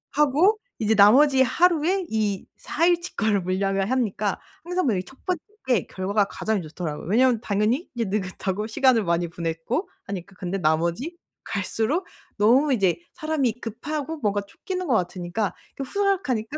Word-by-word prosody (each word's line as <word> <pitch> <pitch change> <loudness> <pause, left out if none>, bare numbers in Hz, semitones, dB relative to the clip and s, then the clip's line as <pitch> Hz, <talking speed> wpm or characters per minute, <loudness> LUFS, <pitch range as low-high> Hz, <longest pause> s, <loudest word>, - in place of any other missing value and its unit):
하고 300 +9 +4 0.2
이제 220 -1 +2
나머지 265 +7 +6
하루에 345 +7 +3
이 210 -3 -1
4 330 - 0
일 345 -1 +3
치 355 - -8
거를 215 -3 +2
물량을 195 +2 0
하니까 215 -6 0 0.2
항상 360 +1 -1
뭐 235 -6 +2
이 - - 0
첫 265 - -16
번째 360 -4 -1 0.3
게 245 -7 +2
결과가 200 +2 0
가장 215 0 -2
좋더라고요. 155 -1 -6
왜냐하면 240 +1 +4
당연히 220 - 0
이제 235 -1 0
느긋하고 195 +1 -2
시간을 230 0 +3
많이 170 0 +1
보냈고 170 - -3 0.2
하니까 195 -1 -7
근데 190 0 -3
나머지 170 - 0 0.3
갈수록 225 - -1 0.3
너무 255 +8 +4
이제 195 -6 +2 0.2
사람이 310 -7 0
급하고 290 +7 -4
뭔가 205 -7 0
쫓기는 365 - -5
것 255 - +2
같으니까 180 +2 -1 0.2
그 275 - -4
후다닥 390 +2 0
하니까 230 +4 -1
220 Hz, 355 characters per minute, -24 LUFS, 195-295 Hz, 0.3 s, 나머지